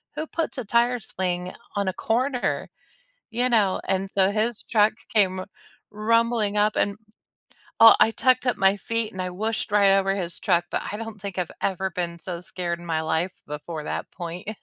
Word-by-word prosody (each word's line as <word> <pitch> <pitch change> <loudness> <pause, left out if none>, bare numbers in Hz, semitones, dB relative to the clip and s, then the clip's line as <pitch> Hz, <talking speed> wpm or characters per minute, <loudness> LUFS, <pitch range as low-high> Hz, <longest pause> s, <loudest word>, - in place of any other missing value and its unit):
Who 310 - -3
puts 330 -2 -3
a 255 - -3
tire 240 +3 +2
swing 180 -3 -3 0.2
on 200 -1 0
a 190 - 0
corner? 250 +5 -1 0.6
You 245 +2 +1
know? 210 -6 +2
And, 190 0 0
so, 190 -1 +4
his 220 +2 -1
truck 215 -2 +3 0.2
came 190 -4 +3 0.5
rumbling 225 0 +1
up 210 +1 +3
and 200 - +1 0.9
oh, 225 - +10
I - - +6
tucked 255 +1 +2
up 250 - +2
my 195 +1 +4
feet 230 +1 -2
and 190 - -4
I 180 - -3
whooshed 220 +4 -2
right 200 -1 +5
over 195 0 +1
his 175 -3 -4
truck, 175 -2 +2
but - - -1
I 205 - -4
don't 225 -2 -7
think 195 -2 -6
I've 180 -2 -1
ever 190 0 0
been 170 -1 -3
so 170 0 -6
scared 175 -1 -4
in 175 - -11
my 160 -1 0
life 160 +3 0 0.2
before 150 +1 -6
that - - -4
point. 175 +1 -7
200 Hz, 190 wpm, -25 LUFS, 180-225 Hz, 0.9 s, oh